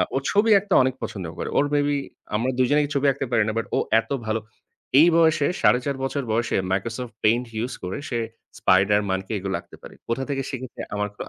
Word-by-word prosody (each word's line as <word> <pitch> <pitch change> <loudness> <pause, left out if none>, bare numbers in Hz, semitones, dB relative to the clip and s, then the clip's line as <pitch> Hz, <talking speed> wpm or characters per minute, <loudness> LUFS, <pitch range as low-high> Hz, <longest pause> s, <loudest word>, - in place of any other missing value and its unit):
ও - - +3
ছবি 215 +2 +3
আঁকতে 195 -1 -3
অনেক 130 0 +1
পছন্দ 95 -4 -5
করে। - - -4
ওর 145 - +4
maybe 145 0 +2 0.4
আমরা 115 +5 0
২ 130 -1 +3
জনেই 145 0 +3
ছবি 140 0 +1
আঁকতে 135 - -3
পারি 115 -2 +3
না, - - +1
বাট 115 - -1
ও - - +2 0.2
এত - - -6 0.2
ভালো 110 0 0 0.6
এই 160 - +8
বয়সে 160 -3 +4
৪.৫ 130 +3 +3
বছর 135 +1 -1
বয়সে 115 +1 0 0.2
Microsoft 115 +5 -3
Paint 115 +3 +3 0.2
use 125 +1 -4
করে, 90 +1 -3
সে 120 - -1 0.4
Spiderman 95 +1 +3
কে - - -8
এগুলো 95 0 -3
আঁকতে - - -16
পারে। - - -11 0.2
কোথা 115 +3 -1
থেকে 135 -1 -1
শিখেছে 130 -1 -7
আমার 105 0 -1
কোন - - -9
125 Hz, 205 wpm, -24 LUFS, 110-140 Hz, 0.6 s, এই